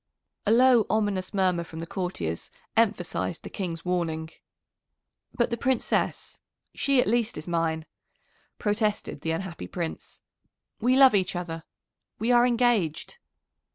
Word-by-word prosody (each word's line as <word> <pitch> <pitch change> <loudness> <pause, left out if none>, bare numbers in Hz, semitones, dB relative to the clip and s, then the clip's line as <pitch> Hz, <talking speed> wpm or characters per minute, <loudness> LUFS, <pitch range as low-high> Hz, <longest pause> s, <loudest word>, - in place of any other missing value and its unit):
A - - +4
low, 245 -1 +5
ominous 205 -3 0
murmur 185 -4 +1
from 160 -1 -11
the 165 - -4
courtiers 165 - -3 0.3
emphasised 200 -6 0
the - - -8
King's 170 -4 -4
warning. 165 -3 -1 1.0
"But 240 0 +1
the 235 - -1
Princess 260 -1 -1 0.3
she 275 -2 +2
at - - +4
least 235 +1 0
is 155 - -7
mine," 165 -2 0 0.7
protested 210 -7 -1
the 165 - -3
unhappy 170 +1 -4
Prince. 170 -3 -6 0.6
"We 250 +3 +3
love 270 -3 +8
each 190 -2 +1
other 165 -2 -5 0.5
we 225 +4 0
are 240 0 +6
engaged." 235 - +1
190 Hz, 130 wpm, -27 LUFS, 165-235 Hz, 1.0 s, love